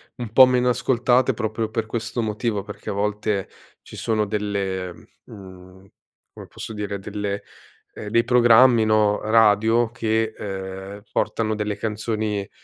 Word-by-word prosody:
un 120 -4 -7
po' 130 +1 +9
meno 125 0 +2
ascoltate 125 +1 +2
proprio 110 0 -2
per 110 0 -2
questo 115 +1 -3
motivo, 105 -1 -2
perché 105 0 -9
a - - -2
volte 105 -1 -2 0.3
ci - - -12
sono 110 -1 0
delle 100 -3 -3 0.3
mhmm, 95 -1 -13 0.5
come - - -11
posso 110 - -8
dire 105 -1 -4
delle 100 0 -4 0.5
ehm, 105 - -7
dei 115 +1 +3
programmi, 120 -1 +5
no, 105 -1 +2
radio 110 +1 +3
che, 110 -2 -1
ehm, 95 0 -7
portano 110 -1 -1
delle 105 -1 -2
canzoni, 105 -2 -3
110 Hz, 140 wpm, -22 LUFS, 100-115 Hz, 0.5 s, po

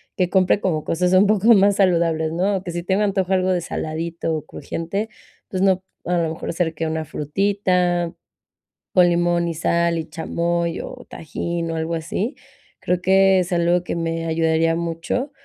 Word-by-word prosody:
que 180 -2 +1
compre 190 +1 +3
como 155 -5 0
cosas 180 +2 0
un 190 +2 +6
poco 215 +2 +5
más 200 -1 +4
saludables, 165 -4 +2
¿no?, 190 +4 +1
o 185 - -7
que 175 - -5
si 175 0 -3
tengo 190 +3 0
antojo 195 -2 0
algo 185 0 +2
de 180 - +1
saladito 165 0 -3
o 155 - -8
crujiente, 185 +9 -4 0.4
pues 185 -1 -2
no, 190 -1 +3 0.2
a 180 0 +1
lo 165 -1 +1
mejor 165 - -5
ser 165 -1 -1
que 160 +1 -3
una 160 0 -2
frutita 180 +2 0 0.8
con 180 -1 +6
limón 175 0 +1
y 165 - -3
sal 170 +1 +1
y 160 - -3
chamoy 170 0 -2
o - - -9
tajín 165 +2 -4
o - - -3
algo 160 +1 -2
así, 195 - -3 0.4
creo 180 0 -1
que 190 +1 +4
es 180 0 -2
algo 175 +1 +2
que - - -4
me 165 0 -2
ayudaría 165 0 +2
mucho 170 - -3
175 Hz, 185 wpm, -21 LUFS, 165-185 Hz, 0.8 s, un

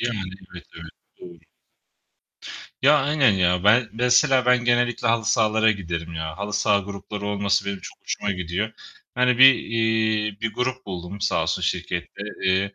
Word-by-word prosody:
Yani, 120 -2 -2 0.3
evet, 85 - -11
evet, 85 0 -10 0.3
doğru. 85 -1 -12 1.4
Ya, 145 +3 +5
aynen 140 -2 +3
ya. 90 -1 +1
Ben 115 +2 +4
mesela 125 +2 +3
ben 125 -1 +3
genellikle 120 -1 +1
halı 115 -1 +1
sahalara 110 0 +2
giderim 85 -4 -5
ya. 80 +1 -5
Halı 100 +1 -5
saha 105 0 +2
grupları 100 +1 -7
olması 100 0 0
benim 100 -1 -4
çok - - -11
hoşuma 100 - -3
gidiyor. 90 +4 -3 0.4
Yani, 125 -1 +2
bir, 135 0 +9
eee, 110 -2 -1
bir 115 -1 -2
grup 130 0 -3
buldum 95 +1 -7
sağ 85 -5 0
olsun 80 - -2
şirkette. - - -3 0.2
Eee, 95 +1 0
105 Hz, 155 wpm, -23 LUFS, 95-120 Hz, 1.4 s, bir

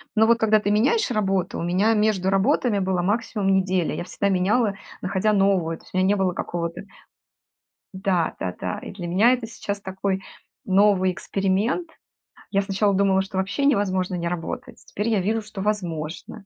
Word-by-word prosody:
но 220 0 +5
вот 235 +1 +4
когда 220 -1 +4
ты 205 -1 -1
меняешь 265 - +2
работу, 195 -5 0
у - - -3
меня 185 +6 +2
между 210 -3 +1
работами 205 +2 +2
была 185 -2 0
максимум 205 -1 0
неделя. 185 -2 +1
Я - - -4
всегда 200 +3 -2
меняла, 200 +4 +2 0.3
находя 190 +3 +1
новую, 190 -5 +2
то - - -22
есть - - -19
у - - -1
меня 185 0 +3
не 205 - +3
было 190 -2 0
какого-то 170 -1 -4 1.1
Да-да-да. 170 - -2
И - - -8
для 180 -3 -7
меня 205 +8 +4
это 250 -3 -3
сейчас 205 -2 -5
такой 190 0 -2 0.4
новый 190 -1 +4
эксперимент. 195 - -1 0.6
Я 200 - +2
сначала 200 +1 +1
думала, 190 0 +3
что 190 0 -6
вообще 200 +9 -1
невозможно 190 -7 +1
не 170 -1 -2
работать, 170 -2 -6
теперь 210 +3 -3
я 220 -3 +2
вижу, 220 +4 0
что 210 -2 -8
возможно. 180 -1 -4
195 Hz, 170 wpm, -23 LUFS, 185-215 Hz, 1.1 s, но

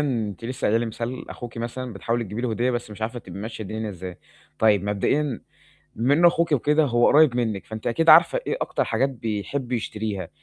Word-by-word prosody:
أنتِ 115 -8 -2
لسه 125 +2 -5
قايلة 110 +2 +3
لي 120 - -1
مثال 120 +3 -5
أخوكِ 120 -1 -8
مثلًا، 120 +1 -5
بتحاولي 115 +5 -2
تجيبي 105 +2 -5
له 125 - -1
هدية 120 +3 0
بس 120 -3 -4
مش 105 +1 -8
عارفة، 115 +3 -3
تبقي 95 -4 -10
ماشية 110 +1 -6
الدنيا 110 +2 -4
إزاي؟ 90 -1 -8 0.4
طيب 105 -3 +3
مبدئيًا 115 +6 0 0.5
بما 125 +6 +2
إنه 170 +3 +6
أخوكِ 170 -1 0
وكده 150 +3 +3
هو 120 -3 +3
قريب 145 -5 +5
منِّك، 110 -5 -2
فأنتِ 110 -1 -7
أكيد 165 +7 0
عارفة 165 - +7
إيه - - -1
أكتر - - -1
حاجات 125 +5 +1
بيحب 120 +2 -4
يشتريها. 105 -5 -3
115 Hz, 200 wpm, -24 LUFS, 110-130 Hz, 0.5 s, عارفة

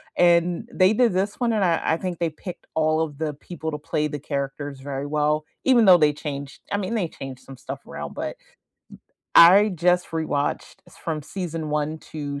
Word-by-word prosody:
and 175 +5 +3
they 185 +2 +4
did 235 0 +3
this 195 +3 -1
one 240 -2 +1
and 210 -3 +2
I 170 -2 +2
I 160 - +1
think 180 -1 -4
they 170 -1 +1
picked 170 +3 -9
all 155 0 +2
of 150 -3 -3
the 155 -1 -2
people 160 +1 -6
to 150 - -3
play 150 +1 -1
the 145 0 -5
characters 140 0 -4
very 135 0 -5
well, 150 +1 0 0.2
even 255 -3 +5
though 185 -2 +9
they 150 -3 +3
changed, 140 -2 -6
I 200 - +1
mean 205 +3 -2
they 185 -7 -1
changed 135 -3 -9
some 135 - -12
stuff 135 +2 -8
around, - - -7
but - - -4 1.0
I 190 +5 +8
just 180 0 +1
rewatched 155 -3 -2 0.3
from 155 -2 -2
season 165 -2 -5
1 150 +1 -1
to 145 -2 -4
160 Hz, 195 wpm, -24 LUFS, 145-180 Hz, 1.0 s, though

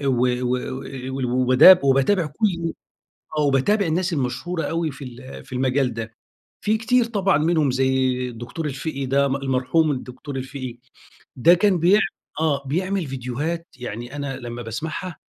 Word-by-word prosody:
أ 140 - -3
و 135 - +3
و 125 0 0 0.2
و 130 - -5 0.4
وال 135 - -2
وباداب 130 +8 +6
وباتابع 140 +7 +3
كل 170 +1 -1 0.7
آه. - - +3
وباتابع 150 +9 +2
الناس 175 +3 0
المشهورة 145 +5 -2
أوي 165 0 -1
في 140 - -9
ال 130 +1 -10
في - - -18
المجال 130 -1 +1
ده. 115 -1 -5 0.5
في 215 +1 +1
كتير 245 +2 +2
طبعًا 200 -7 +1
منهم 155 -2 +2
زي 130 0 +2 0.2
الدكتور 120 +7 -6
الفِقِي 140 -1 -4
ده، 140 +2 +2
المرحوم 135 +3 +1
الدكتور 130 +1 -7
الفِقِي. 130 -2 -6 0.6
ده 165 +8 +6
كان 185 0 +2
بيع 180 +5 +5 0.4
آه. 145 -3 +1
بيعمل 185 +4 -1
فيديوهات 135 +6 -4
يعني 120 +2 -6
أنا 140 -2 -4
لمّا 120 0 -6
باسمعها، 155 - -5
140 Hz, 155 wpm, -22 LUFS, 130-170 Hz, 0.7 s, وباداب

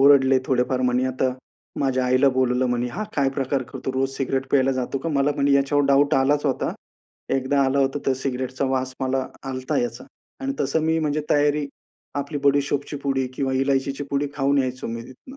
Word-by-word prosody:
ओरडले 135 -1 +6
थोडेफार 125 0 +1
म्हणे, 125 0 +2
आता 130 0 0 0.5
माझ्या 130 -2 +1
आईला 130 +2 +4
बोलवलं 130 0 +2
म्हणे, 120 0 0
"हा 215 - -4
काय 140 -2 +3
प्रकार 135 0 -1
करतो? 130 +1 -6
रोज 135 +1 0
सिगारेट 135 0 -1
प्यायला 135 -1 +3
जातो 130 +1 -2
का? 165 - -4
मला" 145 -1 +2
म्हणे, 140 0 +1
"ह्याच्यावर 140 +1 +3
डाउट 140 +2 +4
आलाच 145 +3 +2
होता. 130 - 0 0.6
एकदा 135 +1 +1
आला 135 +1 +1
होता 135 +1 +1
तर 135 - +4
सिगारेटचा 130 0 -2
वास 130 0 -1
मला 130 0 0 0.2
आला 135 - -5
होता 130 - -1
याचा." 245 -1 -4 0.4
आणि 270 0 -2
तसं 140 +4 +1
मी 160 0 +2
म्हणजे 155 -1 0
तयारी 145 0 +2 0.6
आपली 145 +1 -5
बडी 140 0 +5
सौफची 145 +1 -3
पुडी 135 -2 0
किंवा 135 0 -1
इलायचीची 135 +1 0
पुडी 140 +1 0
खाऊन 140 0 +2
यायचो 130 -1 -2
मी 115 0 -4
तिथनं. 130 - -13
135 Hz, 190 wpm, -23 LUFS, 130-140 Hz, 0.6 s, ओरडले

